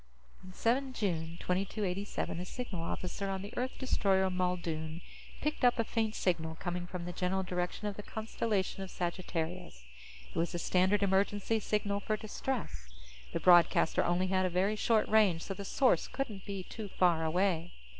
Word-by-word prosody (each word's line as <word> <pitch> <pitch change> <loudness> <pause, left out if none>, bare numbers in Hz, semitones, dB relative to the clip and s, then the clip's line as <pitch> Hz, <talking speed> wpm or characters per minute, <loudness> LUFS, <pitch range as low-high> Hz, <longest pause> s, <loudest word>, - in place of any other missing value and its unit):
On 185 - -10
7 255 +7 +1
June 170 -7 -2
2287, 195 -1 -2
a 180 - -4
signal 210 -4 -5
officer 180 +3 -3
on 190 0 -2
the 205 - -8
Earth 255 +1 -2
destroyer 190 -7 +2
Muldoon 170 -3 -2 0.4
picked 300 -2 -2
up 245 -1 +5
a 230 - +2
faint 220 -1 -1
signal 160 -3 0
coming 175 +1 -4
from 180 -1 -5
the 175 - -5
general 190 +2 0
direction 180 +2 -3
of 205 -1 -3
the - - -4
constellation 215 -2 -2
of 190 - -5
Sagittarius. 175 - -3 0.5
It - - -2
was 170 +2 0
the - - -1
standard 185 +4 +2
emergency 200 +3 +2
signal 205 -1 0
for 215 +1 -1
distress. 215 - -4 0.4
The - - -1
broadcaster 175 -2 +5
only 175 +2 +2
had 185 0 +2
a - - -1
very 190 +4 +1
short 215 +1 +2
range, 205 -6 +4
so 195 - -4
the 200 - -6
source 255 +6 +3
couldn't 220 -8 -4
be 195 -2 -4
too 215 +3 -7
far 175 -4 +3
away. 175 +1 +1
190 Hz, 170 wpm, -32 LUFS, 175-210 Hz, 0.5 s, up